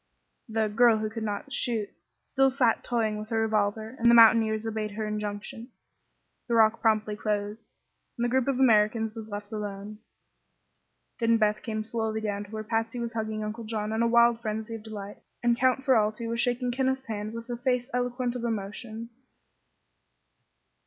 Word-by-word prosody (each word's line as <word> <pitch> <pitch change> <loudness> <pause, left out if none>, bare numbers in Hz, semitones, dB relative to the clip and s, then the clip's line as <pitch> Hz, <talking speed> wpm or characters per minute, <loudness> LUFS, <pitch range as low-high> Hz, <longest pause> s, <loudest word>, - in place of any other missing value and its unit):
The 220 0 +1
"girl 230 +2 +4
who 215 0 -3
could 220 -1 -3 0.2
shoot" 235 -6 -2 0.4
still 270 0 +3
sat 255 -4 +1
toying 220 -3 -1
with 215 +1 -8
her 225 - 0
revolver, 220 +1 0
and 235 +1 +4
the 235 - +7
mountaineers 225 -1 +6
obeyed 215 -1 -2
her 215 +1 -3
injunction. 210 +2 -5 0.8
The 235 - +1
rock 225 0 +4
promptly 215 -1 +2
closed, 210 +1 -3 0.5
and 240 - 0
the - - +1
group 260 +1 +1
of 270 -2 0
Americans 220 -2 +3
was 220 -1 -8
left 205 0 -7
alone. 210 0 -6 1.2
Then 230 -1 +3
Beth 215 -1 +1
came 215 -2 -3
slowly 220 -1 -2
down 205 -1 -3
to - - -16
where 215 0 -5
Patsy 225 +2 -2
was 235 -1 -4
hugging 220 -1 -3
Uncle 215 +2 -5
John 215 -1 -3
in 220 - 0
a 235 - +3
wild 235 0 +4
frenzy 220 0 -4
of 225 - -6
delight, 210 -2 -8 0.2
and 240 0 +4
Count 260 +2 +1
Ferralti 225 -3 +2
was 230 +1 -1
shaking 245 0 0
Kenneth's 265 +1 -1
hand 215 0 -4
with 230 0 -7
a 240 - -3
face 250 0 0
eloquent 245 0 -1
of 245 - -4
emotion. 225 +1 -4
225 Hz, 175 wpm, -27 LUFS, 215-235 Hz, 1.2 s, the